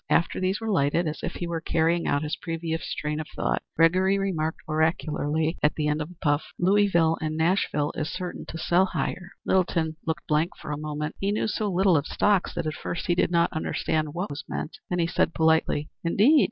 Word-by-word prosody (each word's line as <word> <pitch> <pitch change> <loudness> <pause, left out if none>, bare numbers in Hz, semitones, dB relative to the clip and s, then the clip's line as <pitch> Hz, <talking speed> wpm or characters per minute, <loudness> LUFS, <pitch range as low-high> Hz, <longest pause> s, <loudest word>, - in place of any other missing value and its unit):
After 165 - +2
these 185 +2 0
were 225 -1 -2
lighted, 165 0 +2
as 155 - -3
if - - -3
he 175 - -4
were 170 -1 -3
carrying 165 +1 +1
out 145 +1 +1
his 150 - -2
previous 165 -1 -4
train 150 0 -2
of 155 - -5
thought, - - 0
Gregory 185 +4 +4
remarked, 165 -5 -1
oracularly, 160 0 0
at 150 - +2
the 150 -1 0
end 150 +1 0
of 150 - -4
a 180 - -13
puff: 145 0 +2
"Louisville 175 -4 +3
and 155 0 -2
Nashville 160 -3 +1
is 155 - -2
certain 180 -1 -5
to 165 - -6
sell 175 +3 +3
higher." 180 -1 -3
Littleton 165 -4 +1
looked 165 +1 -2
blank 155 +3 +1
for - - -6
a - - -1
moment. 150 0 -4
He 200 +1 0
knew 210 - 0
so 215 -1 -1
little 185 0 +4
of 145 - -1
stocks 205 -3 +1
that - - -2
at 155 - -1
first 170 - -4
he 175 - +2
did 175 - +2
not 170 -1 +2
understand 155 -1 -1
what 180 +1 -3
was 145 0 -5
meant. 155 - -5
Then 180 - 0
he 170 - +2
said, 165 -1 0
politely: 160 -2 +2
"Indeed!" 215 - +5
165 Hz, 215 wpm, -26 LUFS, 155-180 Hz, -, Indeed